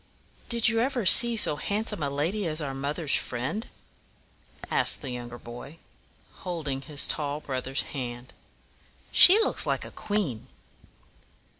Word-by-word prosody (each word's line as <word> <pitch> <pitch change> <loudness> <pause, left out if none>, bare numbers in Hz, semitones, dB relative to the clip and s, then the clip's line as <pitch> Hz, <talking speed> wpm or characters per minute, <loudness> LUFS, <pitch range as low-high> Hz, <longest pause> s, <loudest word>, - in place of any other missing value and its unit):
"Did 235 -1 +2
you 225 0 +1
ever 245 -2 -1
see 235 +5 +7
so 150 - +3
handsome 205 -2 -3
a 140 - -1
lady 170 +8 -2
as 155 0 -1
our 140 -3 -4
mother's 145 +3 -1
friend?" 130 - -2 1.0
asked - - +1
the 135 - -5
younger 120 -1 -8
boy, 120 +7 -11 0.6
holding 155 -7 -5
his 140 +1 0
tall 145 -1 0
brother's 135 -2 -3
hand. 125 -2 -7 0.8
"She 375 +4 +8
looks - - -1
like - - -2
a - - -11
queen." 190 - -4
150 Hz, 135 wpm, -26 LUFS, 135-205 Hz, 1.0 s, She